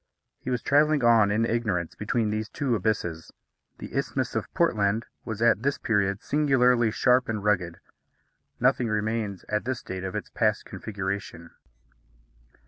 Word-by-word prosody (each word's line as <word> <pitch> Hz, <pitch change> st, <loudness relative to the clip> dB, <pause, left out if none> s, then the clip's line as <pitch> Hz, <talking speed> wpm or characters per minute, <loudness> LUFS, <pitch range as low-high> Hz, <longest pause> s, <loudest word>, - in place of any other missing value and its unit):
He -, -, -6 dB
was 125 Hz, -2 st, -1 dB
travelling 150 Hz, -1 st, +3 dB
on, 115 Hz, -3 st, +5 dB
in 110 Hz, +3 st, +1 dB
ignorance, 105 Hz, -8 st, -1 dB
between 110 Hz, 0 st, -1 dB
these 110 Hz, 0 st, -3 dB
two 135 Hz, -4 st, -1 dB
abysses. 90 Hz, -6 st, -2 dB, 0.5 s
The -, -, -9 dB
Isthmus -, -, -1 dB
of -, -, -3 dB
Portland 105 Hz, +2 st, +1 dB, 0.2 s
was 110 Hz, 0 st, -3 dB
at 115 Hz, -3 st, +4 dB
this 140 Hz, +2 st, 0 dB
period 100 Hz, -2 st, 0 dB
singularly 125 Hz, -5 st, +3 dB
sharp 125 Hz, +3 st, +2 dB
and 105 Hz, -3 st, -2 dB
rugged. 90 Hz, -5 st, 0 dB, 0.8 s
Nothing 125 Hz, -1 st, +2 dB
remains 105 Hz, -2 st, -2 dB
at 105 Hz, 0 st, -1 dB
this 130 Hz, -1 st, -3 dB
date 95 Hz, 0 st, -6 dB
of 95 Hz, -1 st, -4 dB
its -, -, -5 dB
past -, -, 0 dB
configuration. 95 Hz, -4 st, -5 dB
110 Hz, 145 wpm, -26 LUFS, 100-125 Hz, 0.8 s, on